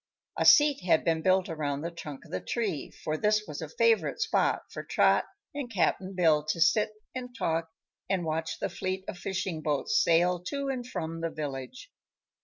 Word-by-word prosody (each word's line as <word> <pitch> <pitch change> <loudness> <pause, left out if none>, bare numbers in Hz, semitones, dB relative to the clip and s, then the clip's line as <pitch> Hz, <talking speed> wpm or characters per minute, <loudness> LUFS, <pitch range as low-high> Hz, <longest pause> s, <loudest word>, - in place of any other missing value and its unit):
A - - 0
seat 290 -1 +7
had 175 -3 +3
been 165 -1 +2
built 185 +2 +3
around 145 -4 -2
the 170 +2 -4
trunk 150 -5 -8
of - - -15
the 95 - -2
tree, 215 - -2
for 155 0 -4
this 210 +4 +2
was - - -6
a - - -5
favorite 465 0 +2
spot 445 - +1
for - - -5
Trot - - +3 0.3
and 280 -4 -5
Cap'n 190 -1 0
Bill 160 -4 +4
to 170 - -1
sit 195 +5 +4 0.2
and 250 -1 -6
talk 165 -4 -1 0.4
and 185 -3 0
watch 160 0 -2
the - - -2
fleet 185 +2 -3
of 180 - -6
fishing 190 -3 -3
boats 150 -3 +1
sail 175 +2 +3
to 280 +5 -2
and 250 -2 -3
from 165 -8 -4
the 165 - -1
village. 150 - -6
175 Hz, 190 wpm, -29 LUFS, 160-215 Hz, 0.4 s, seat